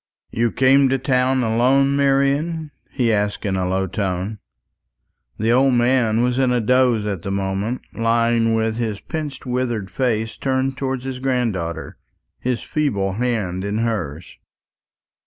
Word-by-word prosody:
"You 115 0 0
came 135 +1 +4
to 135 - +2
town 130 0 +1
alone, 130 +5 +3
Marian?" 140 +3 +1 0.2
he 115 -3 +1
asked 105 +1 -1
in 95 -2 0
a 90 -1 -1
low 95 +1 0
voice. 95 +2 -3 1.0
The 110 +2 +1
old 130 +1 +4
man 120 -2 +2
was 125 +1 +1
in 130 -2 +3
a 125 - +2
doze 120 -1 +2
at 100 -5 -3
this 95 - -4
moment, 100 +5 -2
lying 115 0 +2
with 110 0 0
his 110 -4 -2
pinched 150 -4 -6
withered 120 -6 -2
face 110 -1 -1
turned 130 0 0
towards 130 -1 -3
his 130 -1 -5
granddaughter, 115 -11 -2 0.4
his 125 -1 -2
feeble 100 -11 -1
hand 105 -5 -1
in 100 +1 -2
hers. 95 -9 -3
120 Hz, 145 wpm, -21 LUFS, 105-130 Hz, 1.0 s, came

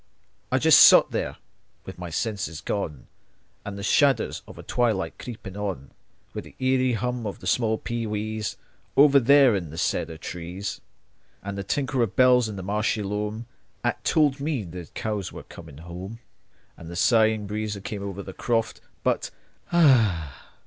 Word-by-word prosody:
I - - +3
just - - +7
sot - - +8
there - - -3 0.5
with - - -9
my 90 -1 -6
senses 95 -4 -3
gone, 80 -9 -4 0.6
And 100 -1 -6
the 100 - -6
shadders 135 +2 +2
of - - -12
twilight 115 -6 0
a - - -14
creepin' 105 -5 -8
on, 95 -10 -4 0.4
With - - -5
the - - -15
eerie 130 -1 +2
hum 120 0 -2
of 100 - -5
the - - -12
small 110 -2 +1
pee 115 0 -4
wees, 105 -1 -3 0.4
Over 140 0 +7
there 135 -2 +6
in 90 -5 -3
the 80 - -9
cedar 80 -1 -1
trees, 90 +4 -6 0.6
And 100 0 -5
the 100 - -4
tinkle 135 +4 -1
of 115 -5 -1
bells 125 -2 +5
in 105 - -6
the 95 - -6
marshy 105 +2 0
loam 105 +3 -3 0.4
'At - - -1
told 145 -3 +2
me 140 -5 -2
the 85 -1 -8
cows 105 -4 -3
were - - -9
coming 80 -5 -12
home, 90 +6 -8 0.6
And 85 - -10
the 85 - -7
sighing 110 +2 +3
breeze 105 0 -3
came 105 -1 -5
o'er 100 0 -5
the 95 - -9
croft, 115 +1 -1 0.2
But - - 0 0.4
ah! 110 - +3
105 Hz, 170 wpm, -25 LUFS, 95-120 Hz, 0.6 s, sot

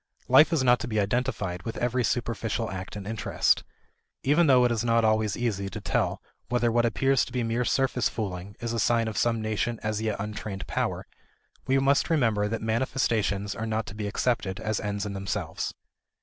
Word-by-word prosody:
Life 135 +7 +7
is 160 -5 +2
not 125 -1 +5
to - - -4
be 110 -2 0
identified 105 -4 -1
with 115 - -5
every 125 +1 0
superficial 115 -1 -1
act 95 +1 -6
and 100 -2 -6
interest. 105 0 +1 0.6
Even 155 +5 +4
though 125 -2 +6
it 120 - +2
is 115 -1 0
not 115 -1 +3
always 110 -1 +2
easy 100 -5 -1
to - - -6
tell - - -1 0.3
whether 120 -1 +2
what 120 +1 +3
appears 125 +5 +2
to - - -7
be 125 -1 -1
mere 115 +2 0
surface 130 -2 +1
fooling 100 -2 -5
is 120 -1 -3
a 115 - -1
sign 115 0 +2
of 110 - -4
some 115 -1 +1
nascent 110 +2 -1
as 110 0 -1
yet 110 -1 -1
untrained 100 -2 -5
power, - - -2 0.6
we 135 0 +3
must 135 +1 +3
remember 115 -10 +2
that 110 +1 -3
manifestations 110 -4 0
are 110 +2 -4
not 110 0 -1
to - - -8
be 105 -1 -4
accepted 100 -3 -1
as 110 -1 -1
ends 105 0 -3
in 100 - -4
themselves. 95 -1 -3
115 Hz, 195 wpm, -27 LUFS, 105-120 Hz, 0.6 s, Life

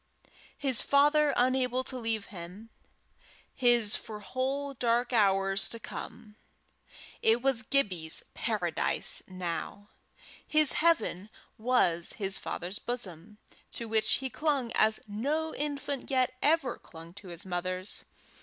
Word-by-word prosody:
his 265 -5 +2
father 295 +1 +4
unable 255 0 +2
to 260 - -6
leave 225 -4 -1
him 185 +6 -9 0.8
his 240 -4 +4
for 215 -1 -6
whole 270 +6 -2
dark 240 0 +1
hours 195 -3 +3
to 230 - -3
come! 210 -1 -8 0.9
It 230 +2 +3
was 270 -4 +2
Gibbie's 195 -11 0
paradise 190 -8 0
now! 185 +2 -5 0.6
His 305 -2 +3
heaven 310 - +1 0.3
was 190 -8 +2
his 195 -1 -1
father's 180 +4 -4
bosom, 210 -5 -6 0.4
to 235 - -2
which 220 -1 +2
he 265 -1 -1
clung 280 -6 0
as 220 -1 +3
no 290 +10 -1
infant 285 -2 -3
yet 255 -2 +2
ever 310 -2 +2
clung 165 +1 -12
to 200 0 -12
his 175 +2 -8
mother's. 185 +1 -2
225 Hz, 120 wpm, -30 LUFS, 195-265 Hz, 0.9 s, father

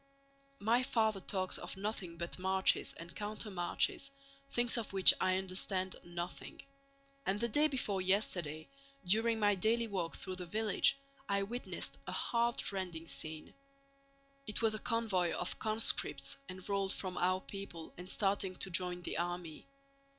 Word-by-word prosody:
My 230 +3 +3
father 220 -5 +2
talks 185 -1 0
of - - -6
nothing 195 -4 -4
but 170 +2 -2
marches 190 +1 +2
and 170 +1 -10
countermarches, 210 +3 -1 0.4
things 240 -2 +1
of 230 -4 -2
which 190 -1 +9
I 185 0 +3
understand 185 0 0
nothing; 175 0 -6 0.6
and 195 +2 0
the 235 - +2
day 295 +7 +3
before 215 -9 -1
yesterday 175 -5 0 0.4
during 225 +5 +4
my 205 -1 +4
daily 220 +5 +2
walk 185 -5 -2
through 185 -1 -4
the 180 -1 -5
village 220 +7 +3 0.3
I 200 0 +2
witnessed 240 +5 -3
a - - -2
heartrending 195 -8 -1
scene.... 155 -1 -2 0.9
It 210 - -1
was 220 -1 +5
a 215 - 0
convoy 210 -7 +1
of - - -3
conscripts 220 +4 0
enrolled 195 +1 -1
from 185 -2 -3
our 185 +1 +3
people 190 -4 -7
and 180 +1 -8
starting 195 -2 +1
to 190 - -2
join 180 0 +1
the - - -3
army. 175 - -4
190 Hz, 145 wpm, -35 LUFS, 180-215 Hz, 0.9 s, which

